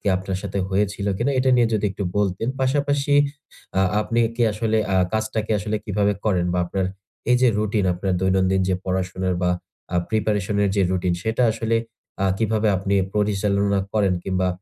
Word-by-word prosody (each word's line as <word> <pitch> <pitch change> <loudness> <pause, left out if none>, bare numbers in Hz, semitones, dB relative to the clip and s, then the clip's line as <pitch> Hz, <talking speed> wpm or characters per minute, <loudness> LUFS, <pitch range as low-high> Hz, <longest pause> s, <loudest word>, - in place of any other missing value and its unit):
কি - - -13
আপনার 95 0 -3
সাথে 100 -1 -3
হয়েছিল 100 +1 -1
কিনা 120 +5 +1
এটা 130 0 +3
নিয়ে 120 -2 +4
যদি 105 -1 0
একটু 95 +1 -4
বলতেন? 100 +2 0
পাশাপাশি 140 +1 +1 0.6
আ - - +4 0.2
আপনি 115 +2 0 0.2
কি 120 - +1
আসলে 110 +1 0 0.2
আ - - +3 0.2
কাজটা 110 +1 -1
কি - - -1
আসলে 105 +1 -2
কিভাবে 105 -1 +1
করেন 90 -5 +1
বা - - +1
আপনার 95 +1 -1 0.4
এই 125 - +6
যে 130 - +6
রুটিন 105 -1 0
আপনার 95 +2 -2
দৈনন্দিন 95 0 +2
যে 95 - +2
পড়াশোনার 95 0 -1
বা 90 - +2 0.4
আ - - +3
প্রিপারেশন 105 -2 0
এর 100 - +1
যে 100 - +4
রুটিন, 90 -1 0
সেটা 110 +4 0
আসলে 115 0 0 0.5
আ - - +3
কিভাবে 110 -1 +1
আপনি 95 +2 -1 0.2
পরিচালনা 100 -1 +1
করেন? 100 -4 +2
কিংবা 95 -1 0
100 Hz, 180 wpm, -22 LUFS, 95-110 Hz, 0.6 s, এই